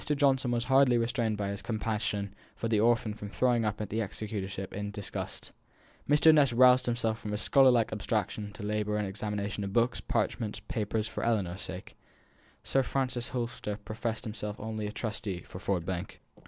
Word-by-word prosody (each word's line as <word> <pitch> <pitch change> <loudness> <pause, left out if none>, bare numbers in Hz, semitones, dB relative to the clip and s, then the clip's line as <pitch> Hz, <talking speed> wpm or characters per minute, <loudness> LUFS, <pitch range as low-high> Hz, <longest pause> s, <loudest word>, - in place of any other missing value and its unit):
Johnson 135 -3 +3
was 120 -1 +1
hardly 130 -1 +5
restrained 115 -2 0
by 100 -1 -2
his 100 0 -4
compassion 105 -3 -2 0.2
for 115 - -2
the 110 -2 +2
orphan 115 -1 +3
from 105 -1 -7
throwing 120 +1 +2
up 105 -1 -1
the 105 +1 -2
executorship 100 -2 -4
in 105 +1 -3
disgust. 100 -1 -6 0.6
Mr. 150 +2 +7
Ness 145 -4 +5
roused 125 +1 +6
himself 115 -2 0
from 105 -1 -5
his 105 +1 -1
scholarlike 125 -5 +5
abstraction 105 0 -2
to 105 - -9
labour 105 0 0
at 105 - 0
the - - -2
examination 105 +1 -3
of 100 0 -4
books, 120 +2 +2
parchments, 105 -3 -1
and - - -15
papers, 110 -4 -1
for 110 - -5
Ellinor's 100 -6 0
sake. 95 0 -7 0.7
Sir 135 - +2
Frank 130 -1 -1
Holster 120 -4 -3
professed 115 0 -3
himself 105 -1 -5
only 110 -1 -3
a - - -4
trustee 105 -4 -4
for 90 - -9
Ford 95 -3 -1
Bank. 95 0 -4
110 Hz, 180 wpm, -30 LUFS, 105-120 Hz, 0.7 s, Mr